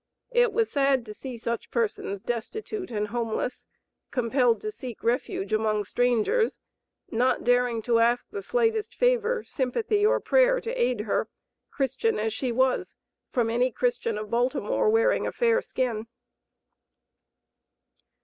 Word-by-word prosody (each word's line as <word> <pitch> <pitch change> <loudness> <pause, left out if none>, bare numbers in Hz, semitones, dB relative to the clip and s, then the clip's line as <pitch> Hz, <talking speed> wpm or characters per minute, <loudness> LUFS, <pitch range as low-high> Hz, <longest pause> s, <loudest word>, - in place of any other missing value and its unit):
It 485 -1 +4
was 445 +1 0
sad 275 -3 +2
to 215 - -8
see 255 +2 -7
such 230 0 -4
persons 205 -4 -2
destitute 370 - -4
and 210 -2 -2
homeless, 235 +2 -3 0.4
compelled 245 -1 +2
to 430 - -3
seek 255 - -9
refuge 230 -3 -1
among 215 -1 +1
strangers, 245 - +1 0.5
not 245 +3 +1
daring 245 -2 +2
to 230 0 +3
ask 235 +1 +2
the 410 - -4
slightest 450 -1 0
favor, - - +2
sympathy 410 - -1
or 470 +4 +4
prayer - - +3
to 470 0 -4
aid 255 - +1
her, 210 -1 -1 0.4
Christian 295 - 0
as 220 0 -1
she 245 +2 -2
was, 260 +2 +1 0.3
from 230 -3 0
any 250 +2 +2
Christian 240 -2 -1
of 215 -1 -6
Baltimore, 255 - +1
wearing 455 +3 +3
a - - -2
fair 475 0 +2
skin. 230 - -2
250 Hz, 140 wpm, -26 LUFS, -, 0.5 s, It